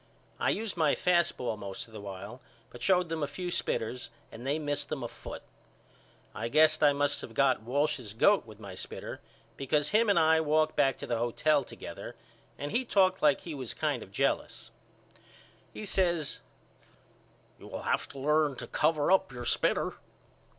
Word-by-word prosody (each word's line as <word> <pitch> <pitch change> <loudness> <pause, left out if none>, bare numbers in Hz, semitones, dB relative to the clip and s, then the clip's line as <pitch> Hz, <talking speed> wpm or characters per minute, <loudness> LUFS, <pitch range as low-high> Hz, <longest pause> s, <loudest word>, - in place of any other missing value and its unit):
I - - +2
used 220 -1 -2
my 155 -4 +3
fast 175 -2 +2
ball 115 -3 -2
most 100 -2 -6
of 115 - -19
the 105 - -7
while 100 +5 -8 0.3
but 120 - -11
showed 180 +2 +3
them 165 -1 -3
a 145 - 0
few 175 +5 -5
spitters 120 -5 -2 0.2
and 120 +3 -8
they 145 +3 +1
missed 145 -2 -2
them 140 -4 -3
a - - -2
foot. - - -9 0.9
I 115 - -3
guess 155 +5 +4
I 145 -1 +7
must 145 0 0
of 115 - -9
got 135 -4 +3
Walsh's 130 -2 -1
goat 200 - +5
with 110 -1 -12
my 100 -3 -8
spitter - - -7 0.4
because 145 +2 0
him 220 +1 +3
and 200 - +4
I 160 0 +5
walked 155 0 +2
back 135 -3 +3
to - - -6
the 120 -2 -1
hotel 145 +5 +2
together - - -9 0.4
and 145 +2 -4
he 250 - +1
talked 190 -5 +3
like 150 -2 +4
he 165 - -6
was 130 -6 -6
kind - - -1
of - - -11
jealous. - - -1 1.0
He 215 - -7
says 175 -6 0 1.2
You - - -12
will - - -6
have - - 0
to 140 - -11
learn 150 +1 +2
to - - -6
cover 155 +1 +1
up 190 0 +4
your 120 -1 -7
spitter. - - +1
145 Hz, 185 wpm, -30 LUFS, 120-160 Hz, 1.2 s, I